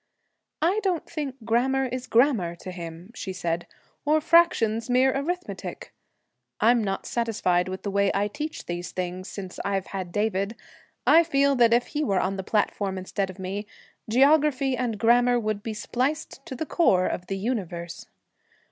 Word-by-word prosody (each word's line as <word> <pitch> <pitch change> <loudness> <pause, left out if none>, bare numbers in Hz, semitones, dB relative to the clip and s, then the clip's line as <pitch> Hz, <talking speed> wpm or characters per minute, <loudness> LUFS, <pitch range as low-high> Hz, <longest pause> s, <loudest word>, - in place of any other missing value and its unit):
'I 370 +6 +3
don't 370 -5 -1
think 290 -5 -4
grammar 265 +4 +2
is 255 0 -4
grammar 225 -10 +3
to 185 +2 -8
him,' 170 +2 -8
she 195 -4 -5
said, 170 -2 -2 0.4
'or 305 +1 +3
fractions 260 -9 +3
mere 255 +2 +4
arithmetic. 355 +6 -4 0.7
I'm 235 0 +4
not 195 -1 -2
satisfied 210 -7 0
with 190 0 -6
the 200 - -2
way 200 0 +2
I 200 +1 +2
teach 300 +8 -6
these 175 0 -4
things 185 +1 -4
since 190 -3 -7
I've 195 -1 -1
had 185 -3 -4
David. 205 +1 -1 0.5
I 335 - +7
feel 280 -3 +2
that 235 -2 +5
if 240 +1 +4
he 300 0 -2
were 195 -9 +1
on 195 +1 0
the 190 - -4
platform 200 -2 0
instead 190 +1 -2
of 185 - -9
me, 195 +2 -4 0.4
geography 275 +1 +4
and 240 -4 -2
grammar 245 +2 +4
would 215 -2 -2
be 220 0 -5
spliced 270 +6 -2
to 260 - -5
the 315 - -3
core 190 - +3
of 180 - -3
the 195 - -2
universe.' 180 -6 -4
225 Hz, 165 wpm, -26 LUFS, 190-265 Hz, 0.7 s, I